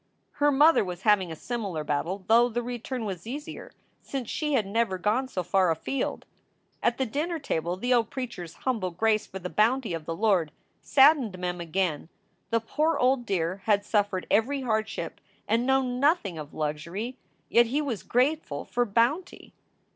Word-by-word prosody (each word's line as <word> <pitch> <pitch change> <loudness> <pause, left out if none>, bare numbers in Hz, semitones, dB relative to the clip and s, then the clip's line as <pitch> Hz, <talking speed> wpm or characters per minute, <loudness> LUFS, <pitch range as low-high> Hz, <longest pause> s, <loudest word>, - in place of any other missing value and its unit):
Her 290 0 +4
mother 295 +2 +5
was 180 0 -6
having 205 -5 +3
a - - -5
similar 200 -6 -4
battle, 165 +7 -2
though 235 +3 +5
the 240 +1 -2
return 245 0 -4
was 190 -2 -5
easier 290 +5 -7 0.3
since 260 -5 -5
she 300 -1 -1
had 230 -7 +2
never 205 -1 0
gone 215 +8 0
so 185 -8 -3
far 185 +1 +2
afield. 205 - -2 0.6
At 240 - +1
the 265 - 0
dinner 310 +8 -2
table 175 - -2
the 245 +6 +1
old 230 -2 +2
preacher 240 -8 -5
s 165 - -12
humble 225 -8 0
grace 215 +5 +1
for 190 - -7
the 180 -1 -5
bounty 225 +2 +1
of 165 -2 -5
the 165 - -3
Lord 190 -6 +2 0.3
saddened 270 -8 +4
Mem 180 -1 -3
again. 170 -2 -1 0.4
The 230 - +2
poor 305 +8 0
old 250 -1 +2
dear 185 -1 0
had 205 -2 +2
suffered 205 -4 0
every 270 +6 +2
hardship 220 -3 -2 0.3
and 235 +2 +1
known 260 -2 +1
nothing 280 - +2
of 150 -1 -8
luxury, 170 - -4 0.3
yet 235 0 +4
he 270 +6 0
was 270 -9 -2
grateful 250 - 0
for 245 0 0
"bounty!" 240 - 0
225 Hz, 175 wpm, -27 LUFS, 185-255 Hz, 0.6 s, mother